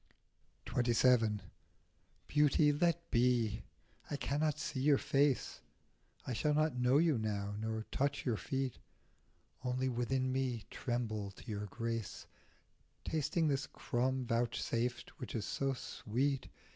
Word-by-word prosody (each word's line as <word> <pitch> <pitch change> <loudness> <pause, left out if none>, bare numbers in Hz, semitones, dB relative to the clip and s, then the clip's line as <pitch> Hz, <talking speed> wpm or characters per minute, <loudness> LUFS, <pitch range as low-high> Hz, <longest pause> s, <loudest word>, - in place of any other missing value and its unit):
XXVII. 120 -3 +3 0.9
BEAUTY, 150 0 +4
let 170 +3 +1
be; 120 -3 +2 0.5
I - - -1
cannot 150 +2 0
see 150 -2 -3
your 140 +1 +5
face, 140 -1 +1 0.6
I 130 - -2
shall 150 +6 +1
not 155 -1 +2
know 125 +2 +4
you 155 -5 +3
now, 105 -2 -2
nor 110 0 -3
touch 140 +1 0
your 120 -4 +2
feet, 135 0 -2 0.8
Only 130 +1 0
within 130 +2 0
me 130 -4 -1
tremble 110 -5 -2
to 100 - -14
your 105 -1 -3
grace, 115 0 -4 0.8
Tasting 160 +1 +1
this 140 -1 0
crumb 130 +1 -1
vouchsafed 120 0 -1
which - - -6
is 110 -3 -1
so 135 -1 0
sweet. 130 +2 -2
125 Hz, 120 wpm, -35 LUFS, 115-140 Hz, 0.9 s, your